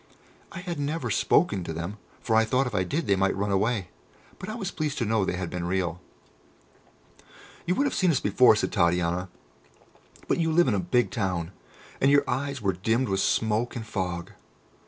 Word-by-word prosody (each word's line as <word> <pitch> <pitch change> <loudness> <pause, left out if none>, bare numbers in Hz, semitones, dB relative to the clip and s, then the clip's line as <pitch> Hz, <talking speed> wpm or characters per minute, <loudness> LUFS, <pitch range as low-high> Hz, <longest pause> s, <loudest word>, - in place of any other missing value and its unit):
I 170 - -7
had 175 -4 -5
never 150 +3 -2
spoken 100 - +2
to 80 - -5
them, 85 +6 -5 0.2
for 110 - 0
I 110 - +5
thought 125 +5 +1
if 125 - -4
I 95 -2 +1
did 150 - -2
they 100 - +3
might 95 0 +1
run 100 +1 -1
away; 100 -1 0 0.5
but 185 - -7
I 215 - -4
was 200 -6 -4
pleased 150 -2 -3
to 120 - 0
know 110 -1 +1
they 95 - -1
had 90 -2 -4
been 90 -1 -3
real. 90 -1 -1 1.7
"You 180 - +2
would 280 - +2
have 280 - 0
seen 185 - +2
us 145 -6 +2
before," 110 +3 +5
said 105 - -1
Titania, 90 0 +1 1.0
"but - - +1
you 165 -1 +1
live 175 0 +4
in 120 - +2
a 100 - +1
big 95 +4 +1
town, 90 -5 -2 0.5
and 135 - +5
your 140 0 +4
eyes 140 -2 -2
were 95 -1 +2
dimmed 110 +7 0
with 95 0 0
smoke 110 +4 0
and 115 -2 -5
fog. 90 -5 -4
110 Hz, 200 wpm, -26 LUFS, 95-140 Hz, 1.7 s, I